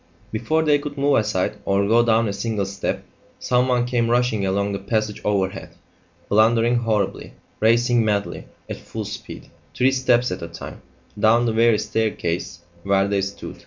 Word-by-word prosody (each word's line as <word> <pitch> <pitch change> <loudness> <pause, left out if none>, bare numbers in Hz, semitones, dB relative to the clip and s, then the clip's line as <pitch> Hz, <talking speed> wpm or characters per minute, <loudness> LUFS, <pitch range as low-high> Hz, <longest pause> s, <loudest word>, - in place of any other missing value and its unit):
Before 160 +9 0
they 150 -2 +3
could 145 0 -7
move 140 +1 +2
aside, 105 -2 -1
or 100 0 +1
go 115 +2 +4
down 115 -1 +2
a 100 - -2
single 100 0 -2
step, 100 +1 -4 0.3
someone 125 -1 +1
came 120 -2 0
rushing 120 -3 +1
along 100 +1 0
the 100 - -3
passage 110 +1 -2
overhead, 95 -3 -2 0.5
blundering 115 +3 +3
horribly, 110 -4 -1 0.3
racing 120 +1 +3
madly, 105 -2 -2 0.2
at - - -5
full - - -7
speed, - - -9 0.2
three 130 +2 +3
steps 125 -2 +2
at 90 - -4
a 85 - -5
time, 85 - -10 0.4
down 115 +3 +4
the 115 - 0
very 115 0 +4
staircase 90 -6 -2 0.2
where 100 +1 +2
they 100 -1 0
stood. 100 +1 -6
110 Hz, 165 wpm, -22 LUFS, 100-120 Hz, 0.5 s, go